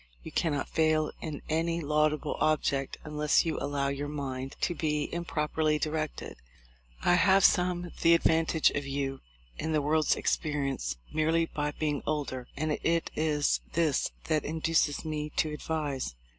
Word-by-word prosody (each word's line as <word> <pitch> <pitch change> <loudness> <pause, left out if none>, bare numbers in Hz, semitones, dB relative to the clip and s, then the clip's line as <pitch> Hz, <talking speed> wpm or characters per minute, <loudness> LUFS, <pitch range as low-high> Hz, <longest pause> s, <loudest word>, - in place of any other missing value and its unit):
You - - -8
cannot 145 -5 0
fail 155 -1 +2
in 155 -3 -5
any 165 +2 0
laudable 150 -1 +1
object 140 -3 +1
unless 150 0 +2
you 165 - -1
allow 140 -1 -1
your 140 +1 -3
mind 135 -2 -4
to 175 - +1
be 150 -3 -1
improperly 155 -2 0
directed. 155 0 -3 0.7
I - - +4
have 190 +2 +5
some 180 -2 +2
the 170 0 +6
advantage 160 -1 +3
of 145 - -2
you 135 -1 -3 0.4
in 160 +1 -1
the 155 - +2
world's 155 +1 +3
experience 135 - -1 0.2
merely 160 +2 +2
by 150 -2 -2
being 150 -2 -1
older; 140 -4 -2
and 155 +2 -1
it 165 0 +1
is 150 -2 +1
this 155 -4 +2
that 155 -2 0
induces 160 -1 0
me 150 -1 -3
to 155 - +2
advise. 145 - -3
155 Hz, 145 wpm, -29 LUFS, 145-160 Hz, 0.7 s, the